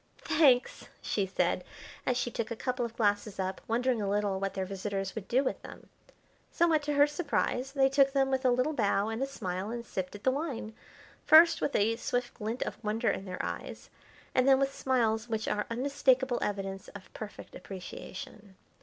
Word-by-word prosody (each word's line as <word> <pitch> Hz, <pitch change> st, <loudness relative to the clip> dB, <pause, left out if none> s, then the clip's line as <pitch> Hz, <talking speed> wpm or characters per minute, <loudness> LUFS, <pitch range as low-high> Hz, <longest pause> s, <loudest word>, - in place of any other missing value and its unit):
"Thanks!" 260 Hz, -6 st, +3 dB
she 200 Hz, -2 st, -1 dB
said, 190 Hz, -, 0 dB, 0.4 s
as 250 Hz, -, +2 dB
she 245 Hz, -1 st, -1 dB
took 225 Hz, -1 st, -3 dB
a 230 Hz, -, -3 dB
couple 250 Hz, +2 st, -2 dB
of 230 Hz, -1 st, -5 dB
glasses 205 Hz, -2 st, 0 dB
up, 190 Hz, 0 st, -2 dB
wondering 240 Hz, 0 st, +1 dB
a 200 Hz, -, -1 dB
little 205 Hz, -1 st, 0 dB
what 195 Hz, 0 st, -3 dB
their 190 Hz, -, -1 dB
visitors 195 Hz, 0 st, -3 dB
would 220 Hz, -3 st, -6 dB
do 260 Hz, +3 st, +2 dB
with -, -, -2 dB
them. -, -, -12 dB, 0.6 s
Somewhat 330 Hz, -3 st, +3 dB
to -, -, +2 dB
her 285 Hz, 0 st, +6 dB
surprise, 285 Hz, -3 st, -1 dB
they 270 Hz, -2 st, +4 dB
took 275 Hz, 0 st, +4 dB
them 270 Hz, -1 st, +2 dB
with 265 Hz, 0 st, 0 dB
a 255 Hz, -, +4 dB
little 255 Hz, +5 st, +2 dB
bow 205 Hz, -4 st, +1 dB
and 225 Hz, +2 st, -3 dB
a 270 Hz, -, 0 dB
smile 190 Hz, -6 st, -4 dB
and 235 Hz, 0 st, -5 dB
sipped 185 Hz, -3 st, -4 dB
at 205 Hz, -, -11 dB
the 260 Hz, -, +4 dB
wine, 265 Hz, -6 st, -4 dB, 0.5 s
first 330 Hz, +2 st, +7 dB
with 285 Hz, -, -1 dB
a 225 Hz, +2 st, +2 dB
swift 245 Hz, +1 st, -2 dB
glint 225 Hz, +2 st, -3 dB
of -, -, -7 dB
wonder 220 Hz, +2 st, +1 dB
in 195 Hz, -, -4 dB
their 185 Hz, -1 st, -4 dB
eyes, -, -, -6 dB, 0.4 s
and 255 Hz, 0 st, +3 dB
then 270 Hz, -1 st, +7 dB
with 275 Hz, 0 st, 0 dB
smiles 230 Hz, -3 st, 0 dB
which 220 Hz, -1 st, -2 dB
are 210 Hz, 0 st, -1 dB
unmistakable 265 Hz, 0 st, +2 dB
evidence 195 Hz, -1 st, -3 dB
of 205 Hz, -, -11 dB
perfect 215 Hz, -1 st, -9 dB
appreciation. 190 Hz, +2 st, -9 dB
230 Hz, 195 wpm, -30 LUFS, 205-265 Hz, 0.6 s, first